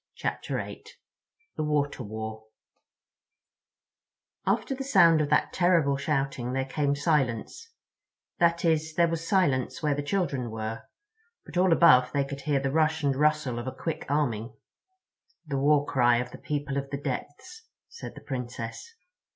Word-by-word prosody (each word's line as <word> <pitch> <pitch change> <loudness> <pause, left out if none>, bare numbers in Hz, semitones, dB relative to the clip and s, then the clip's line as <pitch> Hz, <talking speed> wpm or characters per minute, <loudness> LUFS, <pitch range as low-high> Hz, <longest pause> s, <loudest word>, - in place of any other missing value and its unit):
CHAPTER - - -3
EIGHT - - -9 0.6
The - - -1
Water 145 -2 0
War 110 0 -6 2.0
AFTER 220 +7 +1
THE 270 0 -4
SOUND 165 - +5
of 145 - -1
that 150 - +2
terrible 170 -6 +3
shouting 135 -4 -2
there 135 0 0
came 140 +1 0
silence—that 165 - -2
is, 160 -1 +1
there 170 -1 +4
was 165 0 -3
silence 145 - +1
where 150 -1 +2
the 145 - -2
children 145 -6 -1
were, 110 0 -5 0.6
but - - -12
all 180 0 +3
above 130 -7 +6
they 140 -1 +1
could 140 0 -7
hear 140 -1 +1
the 135 0 -1
rush 160 +1 +1
and 140 -1 +2
rustle 150 -4 +1
of 120 - -6
a - - -2
quick 160 -2 -4
arming. 125 -6 -1 0.9
"The 140 -3 -2
war 145 +1 +3
cry 120 -4 +3
of 125 +1 -3
the - - -10
People 145 -2 -3
of 140 0 -3
the 140 - -3
Depths," 145 - -6 0.2
said 465 - -9
the - - -10
Princess. 125 - -6
145 Hz, 150 wpm, -27 LUFS, 130-160 Hz, 2.0 s, above